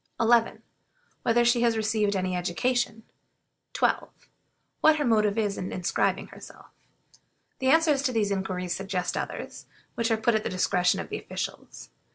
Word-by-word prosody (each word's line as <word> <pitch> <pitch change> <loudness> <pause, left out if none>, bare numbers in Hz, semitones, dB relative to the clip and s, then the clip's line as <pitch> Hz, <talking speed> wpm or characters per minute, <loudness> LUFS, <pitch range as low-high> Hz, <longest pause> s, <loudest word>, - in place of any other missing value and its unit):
11. 230 0 +3 0.6
Whether 240 0 +2
she 240 0 +3
has 230 -2 +2
received 215 -2 0
any 185 -1 -1
education? 225 +6 -1 0.7
12. - - +1 0.7
What 315 0 +5
her 295 -2 -1
motive 215 -3 +2
is 205 -3 -1
in 185 - -4
inscribing 180 -1 -1
herself? - - -13 0.9
The 260 - -1
answers 310 -2 +4
to 275 - 0
these 215 -4 0
inquiries 185 -2 -2
suggest 190 -2 -3
others, - - -6 0.3
which 230 0 -1
are 225 - +2
put 225 +2 +1
at 215 - +1
the - - -3
discretion 180 -1 +1
of - - -6
the - - -4
officials. - - -7
220 Hz, 155 wpm, -27 LUFS, 190-240 Hz, 0.9 s, What